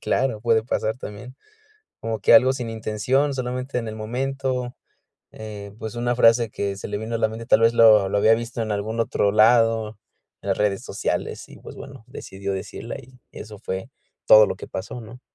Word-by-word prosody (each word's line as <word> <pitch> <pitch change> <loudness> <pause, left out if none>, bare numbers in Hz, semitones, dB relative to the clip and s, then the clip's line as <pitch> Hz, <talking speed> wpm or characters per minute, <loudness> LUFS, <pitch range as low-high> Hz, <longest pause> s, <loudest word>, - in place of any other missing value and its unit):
Claro, 130 -5 0
puede 115 -1 +2
pasar 110 -1 -2
también. 120 +5 -9 0.7
Como 110 -2 -3
que - - +4
algo 130 -2 +7
sin 125 -3 -5
intención, 115 +6 0
solamente 125 +1 -3
en 115 -2 -3
el 110 - -6
momento, 125 +2 -3 0.6
eh, 105 -2 -9
pues, 110 +1 -6
una 120 0 -1
frase 115 -1 +4
que 100 -1 -3
se 100 - -7
le 105 0 -3
vino 110 +2 -5
a 115 - 0
la 110 - +2
mente, 115 +1 -8
tal - - +4
vez 115 +1 +4
lo 110 -4 +6
lo 100 - 0
había 110 +2 +5
visto 115 0 -4
en 110 -1 -2
algún 110 +3 -3
otro 105 -2 +1
lado, 115 -1 +3 0.4
en 100 - -7
las 95 - 0
redes 105 -2 0
sociales. - - -3
Y, - - -14
pues, - - -12
bueno, 135 -4 -11
decidió 100 +1 -6
decirla 95 - -6
y 125 0 -16
eso 105 -2 -10
fue 95 0 -5 0.4
todo 110 -1 +8
lo 95 - -4
que - - -9
pasó, 100 +6 -6
¿no? 120 +3 -12
115 Hz, 200 wpm, -23 LUFS, 105-125 Hz, 0.7 s, todo